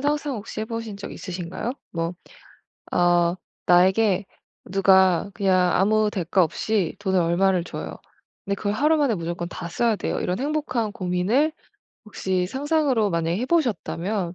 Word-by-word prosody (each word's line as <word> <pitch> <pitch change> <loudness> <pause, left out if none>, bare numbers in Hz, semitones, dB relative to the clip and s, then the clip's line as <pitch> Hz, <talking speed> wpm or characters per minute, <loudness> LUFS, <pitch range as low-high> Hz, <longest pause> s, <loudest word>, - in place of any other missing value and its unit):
상상 290 -1 -1
혹시 215 0 -6
해 - - -1
보신 225 -2 -5
적 200 - -7
있으신가요? 180 +5 -5 0.2
뭐 165 0 -3 0.8
아 175 -1 +3 0.3
나에게 190 +3 +4 0.5
누가 190 -1 +4
그냥 185 -3 +2
아무 215 +2 +3
대가 185 -1 +2
없이 185 +3 -1
돈을 190 -2 +1
얼마를 175 +1 +2
줘요. - - -6 0.5
근데 200 - -1
그걸 205 +1 -2
하루 300 +8 +3
만에 280 -6 +2
무조건 170 -1 -4
다 175 - -7
써야 230 +5 +1
돼요. - - -2
이런 180 +2 -1
행복한 275 -6 -1
고민을 195 - +1 0.5
혹시 190 -3 -1
상상으로 270 - +1
만약에 170 0 0
해 250 - -2
보셨다면 210 - -1
195 Hz, 305 characters per minute, -24 LUFS, 180-230 Hz, 0.8 s, 나에게